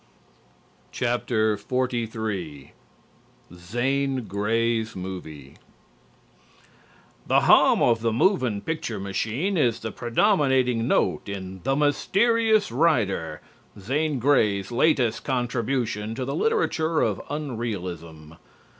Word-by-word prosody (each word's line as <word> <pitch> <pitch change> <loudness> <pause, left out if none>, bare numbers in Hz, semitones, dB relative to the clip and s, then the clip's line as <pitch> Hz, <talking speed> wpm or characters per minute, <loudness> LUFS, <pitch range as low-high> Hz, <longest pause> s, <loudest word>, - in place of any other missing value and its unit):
XLIII 110 - -2 0.8
ZANE 130 +8 -1
GREY'S 110 +2 -1
MOVIE 85 -7 -8 1.7
The - - +4
hum - - +5
of 115 -2 +3
the 115 0 +1
moving 125 - +1
picture 155 -10 -4
machine 110 - -2
is 120 -7 +2
the 110 - -4
predominating 130 - +1
note - - 0
in 95 -1 -7
"The 135 - +1
Mysterious 215 +8 +2
Rider," 110 - 0 0.4
Zane 145 +8 -1
Grey's 105 -7 +2
latest 120 -3 +2
contribution 120 -4 -2
to 130 - -3
the 135 - -3
literature 165 - +1
of - - 0
unrealism. 90 - -5
120 Hz, 90 wpm, -24 LUFS, 100-140 Hz, 1.7 s, hum